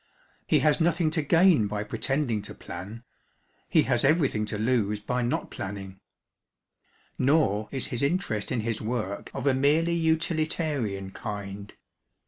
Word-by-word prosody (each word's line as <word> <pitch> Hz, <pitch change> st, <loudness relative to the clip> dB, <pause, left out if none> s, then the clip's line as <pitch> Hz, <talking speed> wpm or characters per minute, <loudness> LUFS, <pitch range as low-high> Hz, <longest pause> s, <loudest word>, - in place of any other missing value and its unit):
He -, -, +3 dB
has 150 Hz, +2 st, +3 dB
nothing 165 Hz, -1 st, +2 dB
to 160 Hz, 0 st, 0 dB
gain 165 Hz, -, +4 dB
by 105 Hz, 0 st, -3 dB
pretending 130 Hz, -2 st, -1 dB
to -, -, -9 dB
plan: 100 Hz, +7 st, -8 dB, 0.7 s
he -, -, +4 dB
has -, -, +1 dB
everything 135 Hz, -8 st, +2 dB
to 105 Hz, -, -3 dB
lose 105 Hz, -2 st, +1 dB
by 125 Hz, +4 st, -2 dB
not 120 Hz, +1 st, -1 dB
planning. 95 Hz, -1 st, -6 dB, 1.2 s
Nor 130 Hz, -7 st, +2 dB
is 135 Hz, -2 st, -2 dB
his 120 Hz, -, -2 dB
interest 140 Hz, -, -1 dB
in 120 Hz, -, 0 dB
his 110 Hz, 0 st, -2 dB
work 110 Hz, -3 st, -3 dB
of 135 Hz, -1 st, -4 dB
a 140 Hz, -, +4 dB
merely 150 Hz, +6 st, +3 dB
utilitarian 155 Hz, -, 0 dB
kind. 100 Hz, -1 st, -6 dB
125 Hz, 140 wpm, -27 LUFS, 105-155 Hz, 1.2 s, gain